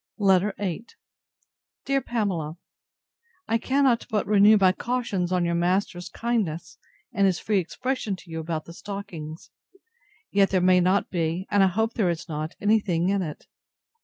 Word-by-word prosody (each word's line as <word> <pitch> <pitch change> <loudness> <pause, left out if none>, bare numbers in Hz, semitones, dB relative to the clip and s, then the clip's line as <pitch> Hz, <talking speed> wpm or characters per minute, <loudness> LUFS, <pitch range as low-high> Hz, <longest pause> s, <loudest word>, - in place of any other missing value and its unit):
LETTER 195 -1 +3
VIII 200 +2 -3 1.0
DEAR 275 0 +1
PAMELA, 180 -11 -2 0.9
I 230 +1 +1
cannot 265 -2 +2
but 215 -2 0
renew 210 +1 +6
my 190 -2 +5
cautions 200 -5 -2
on 180 -1 +1
your 170 - 0
master's 175 +1 0
kindness, 210 -9 -2 0.3
and 200 -1 +3
his 185 -2 +1
free 210 -2 +1
expression 235 +3 -3
to 180 -2 -15
you 160 - -4
about 160 -1 -4
the 170 - -11
stockings. 175 -5 -8 0.8
Yet 195 -1 +4
there 190 - +2
may 180 0 +5
not 185 +3 +1
be, 170 +1 -1
and 205 -1 +4
I 195 - +6
hope 220 +5 0
there 200 -6 +1
is 170 +1 -3
not, 155 0 -4
any 215 +2 +3
thing 175 -3 0
in 200 0 +1
it. 155 -5 -6
190 Hz, 160 wpm, -25 LUFS, 170-210 Hz, 1.0 s, renew